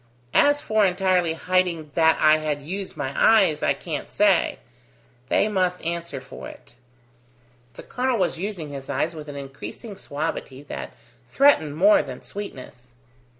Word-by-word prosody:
As 290 0 +4
for 215 -1 +2
entirely 180 -3 +2
hiding 170 -3 0
that 160 -1 +4
I 155 0 +5
had 150 -2 -3
used 190 +5 -6
my 135 -2 -3
eyes, 195 -9 +4
I - - +2
can't - - -5
say: - - +2 0.7
they - - +3
must 185 -3 0
answer 170 0 -3
for - - -10
it." - - -14 1.0
The - - -10
colonel 250 -1 -1
was 180 -4 0
using 185 -6 -4
his 140 -1 -8
eyes 140 +4 -1
with 155 -2 -9
an 145 - -7
increasing 140 - -8
suavity 145 -5 -5
that 70 - -7 0.3
threatened 160 - +4
more 200 +5 +6
than 130 -2 -9
sweetness. 130 -11 -9
165 Hz, 150 wpm, -24 LUFS, 145-195 Hz, 1.0 s, more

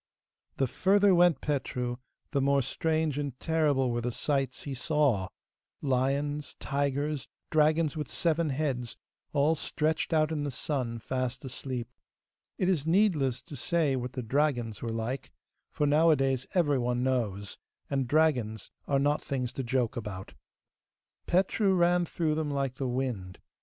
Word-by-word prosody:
The 135 - +2
further 195 +8 +4
went 175 -2 +4
Petru, 125 -4 -2 0.3
the 140 -3 +1
more 140 0 +3
strange 160 0 0
and 140 -3 -4
terrible 150 -6 +2
were 120 0 -1
the 120 +1 -1
sights 135 0 -1
he 140 - -4
saw 130 - +1 0.5
lions, 140 +2 0
tigers, 140 0 -1 0.2
dragons 155 0 +3
with 150 -1 -3
seven 165 -1 0
heads, 130 -4 -2 0.3
all 145 +2 +3
stretched 155 +1 -1
out 155 -1 +3
in 155 -2 -1
the 145 - -1
sun 125 -3 -2
fast 130 +2 -3
asleep. 125 -2 -4 0.7
It 185 - +1
is 165 -5 +1
needless 165 - +2
to 155 - -9
say 155 -3 +1
what 125 0 -4
the 125 - -4
dragons 120 -4 0
were 115 - -3
like, 115 +4 -3 0.4
for 150 - 0
nowadays 145 -4 +3
everyone 125 -7 +2
knows, 105 -7 -1 0.3
and 135 -3 -1
dragons 125 -8 +1 0.2
are 140 - +2
not 145 +2 +2
things 125 -3 -2
to 135 - -3
joke 125 -2 0
about. 105 -5 -6 0.9
Petru 190 +2 +2
ran 175 0 +3
through 160 -2 -1
them 155 -1 -1
like 140 -2 -1
the 135 - -2
wind. 120 -8 -3
140 Hz, 145 wpm, -29 LUFS, 125-155 Hz, 0.9 s, further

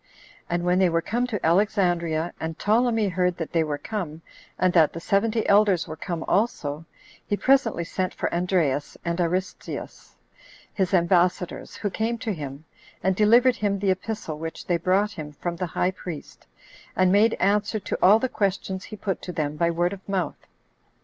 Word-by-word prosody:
And 175 0 -1
when 180 +1 +3
they 185 -2 +4
were 165 0 0
come 245 +3 -1
to 210 -6 -3
Alexandria, 175 -3 +1
and 160 0 -4
Ptolemy 225 0 +2
heard 180 -1 0
that 165 - -5
they 165 -2 +2
were 150 -2 -2
come, 165 -5 -5 0.3
and 185 -1 +2
that 160 -4 +5
the 165 - -5
seventy 215 +5 +1
elders 200 -3 +4
were 155 - -6
come 165 0 -4
also, 165 -8 0 0.4
he 205 - 0
presently 255 -9 +2
sent 185 +2 -2
for - - -3
Andreas 170 -6 0
and 170 +1 0
Aristens, 180 +2 -4 0.6
his 190 -2 0
ambassadors, 180 +1 +1
who 205 - -3
came 225 +4 -1
to 225 -2 -3
him, 145 -2 -7 0.4
and 190 +1 +2
delivered 235 +5 +5
him 205 -1 0
the 195 -1 +1
epistle 185 -5 -4
which 165 0 -6
they 175 - +1
brought 190 +5 +1
him 155 -6 -8
from 170 +3 -4
the 180 0 -2
high 180 +2 0
priest, 175 -5 -9 0.5
and 185 -1 +3
made 215 +3 +4
answer 205 +2 +1
to - - -3
all 200 +4 +7
the 260 - -1
questions 195 -4 -2
he 215 - -8
put 195 -2 -3
to 180 - -6
them 150 -3 -2
by 170 +2 +1
word 175 +2 0
of 195 0 -11
mouth. 190 -3 -2
185 Hz, 180 wpm, -25 LUFS, 170-205 Hz, 0.6 s, all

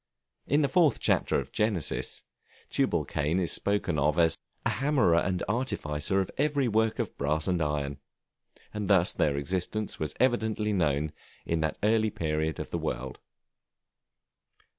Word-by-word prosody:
In 145 +3 +3
the - - +3
fourth 155 +1 +3
chapter - - +2
of - - -7
Genesis, 105 -8 -1 0.5
Tubalcain 75 +5 0
is 90 -3 +1
spoken 100 -6 +1
of 75 +3 +2
as 80 -2 +4 0.3
"a - - +2
hammerer 135 - +2
and 90 0 -1
artificer 95 - -1
in - - -9
every 145 -2 +2
work 110 0 +1
of - - -3
brass 75 +2 0
and 90 -2 +1
iron," 75 -2 -2 0.7
and 105 -2 -3
thus 95 -3 +4
their 70 -2 +1
existence 95 +8 -2
was 75 -1 -3
evidently 110 -4 +1
known 75 -4 +1 0.3
at 85 -1 0
that 80 - -1
early 110 +1 +3
period 80 -4 -2
of - - -6
the - - -1
world. 65 +1 -4
90 Hz, 145 wpm, -28 LUFS, 75-110 Hz, 0.7 s, as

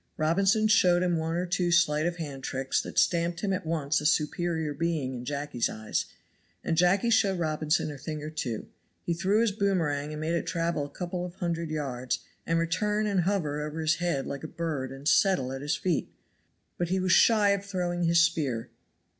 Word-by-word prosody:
Robinson 195 +7 +3
showed 180 -5 +4
him 175 -1 +1
one 160 0 -1
or 175 +1 0
two 175 0 0
sleight 160 -2 +3
of 175 - -2
hand 140 -5 -6
tricks 135 +1 -1
that - - -9
stamped 170 0 +2
him 200 -2 0
at 185 -3 -3
once 155 -2 0
a - - -6
superior 160 0 0
being 155 -4 -1
in 125 -1 -6
Jacky's 140 -3 -2
eyes, 110 0 -2 0.6
and 165 - 0
Jacky 185 +7 +3
showed 200 -4 +3
Robinson 155 -2 0
a 145 - -9
thing 155 +1 -5
or 155 - -5
two 125 -8 -4 0.4
He 170 - -1
threw 195 +6 +2
his 230 -2 +2
boomerang 165 -8 0
and 150 - -5
made 160 +2 -1
it 170 - -1
travel 165 -3 -1
a - - -16
couple 180 +1 -4
of 180 0 -7
hundred 170 -3 -2
yards, 130 -5 -3 0.3
and 165 - +2
return 210 +6 0
and 200 -3 +1
hover 155 -7 0
over 150 +1 -5
his 155 0 +2
head 170 -6 -1
like 140 +1 -5
a - - -4
bird 150 -6 -3
and 135 +2 -7
settle 185 - +3
at 135 0 -5
his 145 +1 0
feet; 175 -5 -1 0.7
but 175 -1 -1
he 190 +1 +1
was 185 0 +1
shy 210 +2 +5
of 200 0 0
throwing 180 -3 -2
his 170 0 +4
spear. 140 -8 +1
165 Hz, 205 wpm, -28 LUFS, 150-180 Hz, 0.7 s, shy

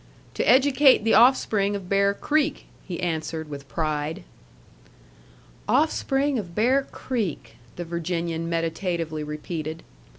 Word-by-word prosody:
"To - - -1
educate 265 -2 +5
the 225 - +2
offspring 215 -4 +4
of 195 -3 -6
Bear 200 +1 +2
Creek," 305 +3 0 0.2
he 175 -3 -5
answered 160 -2 -3
with 140 -1 -8
pride. 155 +2 -2 1.5
"Offspring 280 -3 +1
of 175 -5 -8
Bear 255 +6 +3
Creek," 220 - -4 0.2
the 175 - -5
Virginian 170 0 -3
meditatively 165 -1 -2
repeated. 155 +1 -5
175 Hz, 110 wpm, -24 LUFS, 160-240 Hz, 1.5 s, educate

